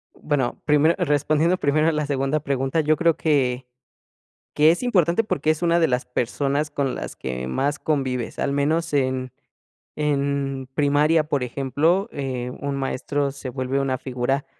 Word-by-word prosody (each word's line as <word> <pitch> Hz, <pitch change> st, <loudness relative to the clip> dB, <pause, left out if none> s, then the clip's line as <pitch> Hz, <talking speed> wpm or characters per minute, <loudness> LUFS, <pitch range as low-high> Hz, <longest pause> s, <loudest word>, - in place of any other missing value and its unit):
Bueno, 145 Hz, -5 st, -2 dB
primero 150 Hz, +2 st, +4 dB
respondiendo 155 Hz, +3 st, +2 dB
primero 155 Hz, 0 st, +2 dB
a -, -, +4 dB
la 150 Hz, -1 st, -1 dB
segunda 140 Hz, +1 st, 0 dB
pregunta, 140 Hz, +1 st, 0 dB
yo 155 Hz, +1 st, +2 dB
creo 170 Hz, -2 st, +2 dB
que, 130 Hz, -5 st, +1 dB, 0.9 s
que 155 Hz, +2 st, +6 dB
es 175 Hz, -, -1 dB
importante, 195 Hz, -4 st, +2 dB
porque 155 Hz, -6 st, 0 dB
es 155 Hz, +2 st, -3 dB
una 170 Hz, 0 st, +3 dB
de 165 Hz, -, +4 dB
las 125 Hz, 0 st, -1 dB
personas 140 Hz, +4 st, -1 dB
con 140 Hz, -3 st, -1 dB
las -, -, -6 dB
que 65 Hz, 0 st, -5 dB
más 140 Hz, -, -1 dB
convives, 130 Hz, -5 st, -2 dB
al 140 Hz, -, 0 dB
menos 155 Hz, +3 st, 0 dB
en 130 Hz, -2 st, 0 dB, 0.7 s
en 140 Hz, -2 st, -1 dB
primaria, 150 Hz, +2 st, +3 dB
por 145 Hz, -3 st, -1 dB
ejemplo, 145 Hz, -, 0 dB
eh, 130 Hz, -3 st, -4 dB
un 140 Hz, -1 st, -2 dB
maestro 140 Hz, +1 st, -2 dB
se 140 Hz, -1 st, -8 dB
vuelve 130 Hz, +1 st, -2 dB
una 130 Hz, -2 st, -1 dB
figura 130 Hz, +2 st, -2 dB
140 Hz, 160 wpm, -23 LUFS, 130-155 Hz, 0.9 s, que